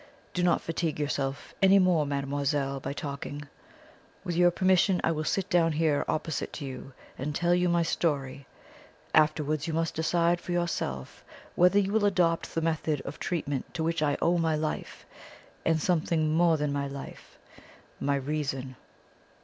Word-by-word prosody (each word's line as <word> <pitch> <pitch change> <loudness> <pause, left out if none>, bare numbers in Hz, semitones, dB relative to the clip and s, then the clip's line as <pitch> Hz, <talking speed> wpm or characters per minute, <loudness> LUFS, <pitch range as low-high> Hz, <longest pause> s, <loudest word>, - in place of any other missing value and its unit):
Do 180 - -1
not 175 -1 +3
fatigue 165 -2 -2
yourself 140 -1 -2
any 195 0 +7
more, 180 -6 +3
mademoiselle, 140 0 -1
by 135 - -4
talking. 145 0 -5 0.8
With 175 - -3
your 175 +1 +5
permission 185 +1 +3
I - - +2
will 155 -1 -2
sit 195 +3 0
down 165 -2 +3
here 155 -2 +2
opposite 155 -1 -2
to 145 - -5
you 135 0 -8 0.3
and 145 +3 -3
tell 175 +2 +2
you 180 0 +2
my 170 0 +3
story. 140 -5 -1 0.7
Afterwards 155 -1 +2
you 165 - -2
must 165 0 0
decide 170 +2 +1
for 175 - -4
yourself 115 - -3 0.3
whether 180 +3 +4
you 200 -1 +2
will 215 -1 +2
adopt 175 -4 +1
the 165 - +1
method 155 -3 -1
of 140 - -8
treatment 145 -6 -3
to 160 - -1
which 165 0 0
I 145 -2 +1
owe 175 +1 +3
my 160 -1 +1
life, 155 0 -4 0.6
and 160 0 +2
something 160 -2 +1
more 165 0 +4
than 145 -1 -1
my 140 0 -1
life 140 0 -9 0.6
my 140 0 +1
reason." 135 -2 -3
155 Hz, 165 wpm, -28 LUFS, 145-175 Hz, 0.8 s, any